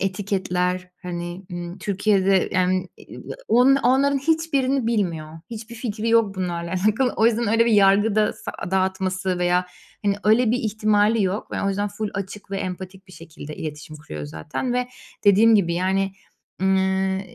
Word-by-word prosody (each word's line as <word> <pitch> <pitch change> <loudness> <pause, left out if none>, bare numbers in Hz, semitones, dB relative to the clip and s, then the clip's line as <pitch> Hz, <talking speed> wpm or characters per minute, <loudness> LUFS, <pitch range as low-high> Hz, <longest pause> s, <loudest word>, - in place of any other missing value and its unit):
etiketler, 185 -2 -1
hani, 175 +1 -6
ımm, 175 +1 -6
Türkiye'de, 195 -1 +2
yani, 185 0 +1 0.2
ııı, - - -9 0.3
o 240 - +4
onların 275 +1 +4
hiçbirini 275 -4 +1
bilmiyor. 165 -8 -2
Hiçbir 230 +1 -8
fikri 225 -1 -3
yok 225 -3 +3
bunlarla 170 -2 -3 0.2
alakalı. 245 +4 +2
O 220 - +4
yüzden 230 -1 +1
öyle 230 +1 +3
bir 235 - +2
yargı 205 +1 +4
da 215 0 +3
sa - - -8 0.2
dağıtması 190 -1 0
veya, 180 0 +1 0.4
hani, 200 -1 +2
öyle 220 +2 +4
bir 245 - +1
ihtimali 215 0 +2
yok 190 +2 -2
ve - - -2
o 200 - +1
yüzden 205 +1 -1
full 205 +1 -4
açık 195 +1 -6
ve 195 - -2
empatik 190 +1 -6
bir - - -14
şekilde 155 -3 -10
iletişim 155 0 -7
kuruyor 75 - -8
zaten 80 - -4
ve 250 0 -1 0.4
dediğim 215 +3 +6
gibi, 170 -5 +2
yani. 190 +2 0 0.5
Emm, 190 0 +3
ııı, 190 0 0
195 Hz, 165 wpm, -23 LUFS, 185-220 Hz, 0.5 s, dediğim